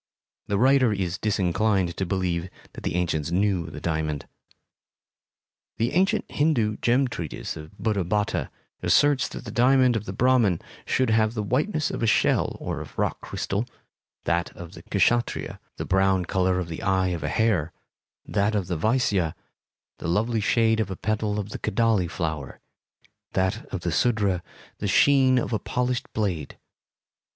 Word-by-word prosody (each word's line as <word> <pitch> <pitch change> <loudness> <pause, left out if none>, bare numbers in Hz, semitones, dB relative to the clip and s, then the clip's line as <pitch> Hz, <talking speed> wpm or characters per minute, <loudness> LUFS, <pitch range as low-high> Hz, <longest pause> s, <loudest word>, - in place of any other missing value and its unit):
The 100 - 0
writer 130 +1 +4
is 95 -3 -2
disinclined 95 -2 +1
to 95 - -2
believe 90 -1 -1 0.2
that - - -9
the - - -2
ancients 80 -4 0
knew 95 -2 +1
the - - -8
diamond. 80 -3 -2 1.5
The 115 +2 0
ancient 185 +4 +2
Hindu 120 -9 +1
gem 130 +3 +2
treatise 85 - -5
of 75 -1 -11
Buddhabhatta 105 -1 0 0.3
asserts 145 -2 +3
that - - -9
the - - -6
diamond 125 0 +4
of 110 -2 -2
the - - -4
Brahmin 120 -6 +3 0.3
should 130 -3 +1
have 110 0 +2
the 105 - -1
whiteness 155 - 0
of - - -4
a 115 - +2
shell - - +2
or - - -4
of - - -11
rock - - -1
crystal; 105 +5 -3 0.6
that 85 +2 0
of 85 -1 -9
the - - -11
Kshatriya, 120 +5 0 0.2
the - - -4
brown 95 -1 +2
color 95 0 +1
of 90 -2 -2
the 80 -1 -6
eye 95 -1 +1
of 85 -3 -3
a - - -1
hare; 100 -9 +1 0.5
that 105 +1 0
of 100 -3 0
the 90 -1 -2
Vaisya, 100 -4 +1 0.6
the - - -4
lovely 110 +6 +1
shade 110 +1 +2
of 110 - 0
a 95 - -4
petal 105 0 -1
of 105 -1 -3
the - - -6
kadali 110 -5 +1
flower; 80 -5 -4 0.7
that 95 0 0
of - - -5
the - - -2
Sudra, 105 -7 +1 0.4
the 105 - -2
sheen 130 +5 +5
of 120 - -1
a 110 - +1
polished 125 0 -2
blade. 90 -9 -2
105 Hz, 160 wpm, -25 LUFS, 90-115 Hz, 1.5 s, sheen